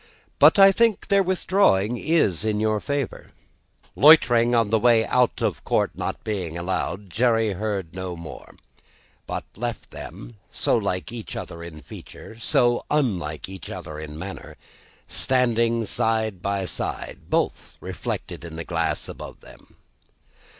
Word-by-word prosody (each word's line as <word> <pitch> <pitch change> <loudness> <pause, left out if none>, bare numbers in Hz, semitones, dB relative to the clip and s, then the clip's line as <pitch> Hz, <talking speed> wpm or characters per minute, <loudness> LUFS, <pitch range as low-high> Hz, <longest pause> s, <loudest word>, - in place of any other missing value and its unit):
But - - +7
I 195 0 +9
think 230 +1 +1
their 200 0 +5
withdrawing 180 - +2
is 150 - +1
in 105 -1 0
your 110 0 +1
favour." 140 +1 -3 0.7
Loitering 120 -6 +6
on 115 -3 +2
the 110 - +4
way 115 -1 +4
out 125 -1 +1
of - - -1
court - - +1
not - - -4
being 90 -6 -3
allowed, 95 +2 -3
Jerry 115 0 +2
heard 100 -3 -3
no 95 -1 -5
more: 85 -2 -10 0.7
but - - -4
left 120 +2 -5
them - - -9
so - - +1
like 90 +3 -2
each 120 -2 -7
other 85 - -7
in 80 -2 -9
feature, 110 +10 -11
so 120 -1 +2
unlike 95 - -1
each 95 -1 -9
other 75 0 -7
in 75 -1 -8
manner 95 +4 -8 0.5
standing 115 -3 +2
side 110 -4 -1
by 100 0 -1
side, 85 - -4
both - - -1
reflected - - -5
in 85 -2 -8
the 85 - -6
glass - - -1
above - - -9
them. - - -17
110 Hz, 145 wpm, -24 LUFS, 90-120 Hz, 0.7 s, I